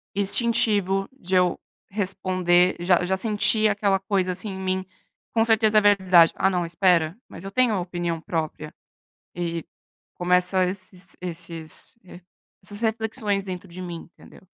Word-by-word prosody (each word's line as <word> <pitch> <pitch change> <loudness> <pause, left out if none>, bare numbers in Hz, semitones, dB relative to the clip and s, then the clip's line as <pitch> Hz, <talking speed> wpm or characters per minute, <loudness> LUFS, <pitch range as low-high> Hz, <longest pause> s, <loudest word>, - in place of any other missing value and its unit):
instintivo 200 -2 +2
de 190 -8 -4
eu 180 -1 +2 0.3
responder 185 -2 +1
Já 175 0 +3
já 190 +1 0
senti 215 +1 +3
aquela 200 -2 +1
coisa 190 -2 -1
assim 185 +4 -2
em 190 -1 -6
mim, 190 0 -2 0.5
"com 225 - +3
certeza 220 -1 +3
é - - -1
verdade, 190 -5 +5
ah 190 - +2
não, 180 -2 -1
espera, 170 0 +1
mas - - -11
eu 195 - -6
tenho 250 +1 +2
a 200 - 0
opinião 175 -2 -3
própria." 155 -2 -4 0.6
E 170 -1 -3 0.5
começa 180 +1 +2
esses 185 0 -7
esses 170 +1 -6
eh, 180 -1 -13 0.4
essas 205 +2 -7
reflexões 220 -2 -1
dentro 185 0 -7
de 175 +2 -10
mim, 170 -1 -8
entendeu? - - -17
185 Hz, 150 wpm, -24 LUFS, 175-205 Hz, 0.6 s, verdade